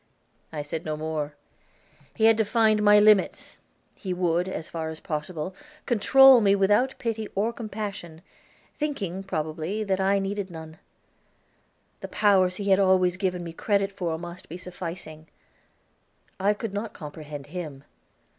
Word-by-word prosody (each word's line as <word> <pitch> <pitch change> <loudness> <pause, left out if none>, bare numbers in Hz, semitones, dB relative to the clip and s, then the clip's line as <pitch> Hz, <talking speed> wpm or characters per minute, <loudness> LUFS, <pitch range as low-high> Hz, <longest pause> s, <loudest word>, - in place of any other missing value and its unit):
I 150 -2 -4
said 155 +2 -5
no 155 -1 -3
more. 155 -1 -3 0.8
He 220 - -2
had 225 0 +7
defined 220 0 +2
my 210 0 +6
limits, 210 -2 +3 0.3
he 185 -2 -5
would, 175 0 0
as 160 -4 -5
far 160 -1 -4
as 160 0 -5
possible, 155 +3 -4 0.3
control 265 +2 +7
me 200 -1 +4
without 205 +7 +2
pity 225 -3 -3
or 215 +4 0
compassion, 200 -7 -6 0.6
thinking, 205 - -3
probably, 165 +2 -3
that 195 -2 0
I 195 +1 +3
needed 195 0 -3
none; 160 -1 -10 1.2
the - - -6
powers 190 -3 +3
he 200 0 -1
had 190 - +5
always 185 -2 +3
given 185 -2 -2
me 165 -1 -7
credit 200 +2 0
for 175 -5 -3
must 175 +2 -9
be 170 - -6
sufficing. 170 -3 -8 1.1
I 205 +2 +2
could 210 -1 -5
not 210 +1 -4
comprehend 150 -2 -8
him. 155 -7 -6
185 Hz, 145 wpm, -26 LUFS, 165-205 Hz, 1.2 s, had